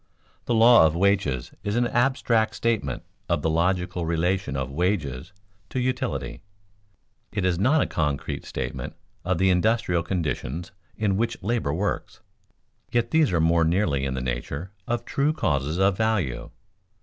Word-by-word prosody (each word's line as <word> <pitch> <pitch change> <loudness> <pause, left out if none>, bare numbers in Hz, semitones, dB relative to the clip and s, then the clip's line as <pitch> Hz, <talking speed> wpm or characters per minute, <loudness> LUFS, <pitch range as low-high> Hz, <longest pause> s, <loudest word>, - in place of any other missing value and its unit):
The 120 - +1
law 115 -5 +7
of 80 - -2
wages 95 -9 +1
is 105 +1 -1
an 120 0 +2
abstract 120 -3 +1
statement 115 -2 -1 0.3
of 85 -4 0
the 80 - +1
logical 90 +1 0
relation 85 0 0
of 65 0 -3
wages 80 -3 -1 0.4
to 130 - -2
utility; 125 - -2 0.9
it 100 -3 -1
is 90 -2 +1
not 140 +9 +4
a - - -1
concrete 75 -4 -2
statement - - -5 0.3
of 90 0 0
the 95 +2 +3
industrial 90 -2 +2
conditions 85 -1 -3 0.3
in 100 -3 +1
which 115 -1 -2
labor 110 -8 0
works, 95 +7 -3 0.7
yet 120 -1 +1
these 160 -6 +3
are 85 - +2
more 80 +1 +3
nearly 80 -5 +1
in 65 -1 -2
the 65 - -3
nature 65 +8 -4 0.2
of 120 0 -2
true 145 +3 +1
causes 75 - 0
of 95 0 +3
value. 95 - 0
90 Hz, 150 wpm, -25 LUFS, 80-110 Hz, 0.9 s, law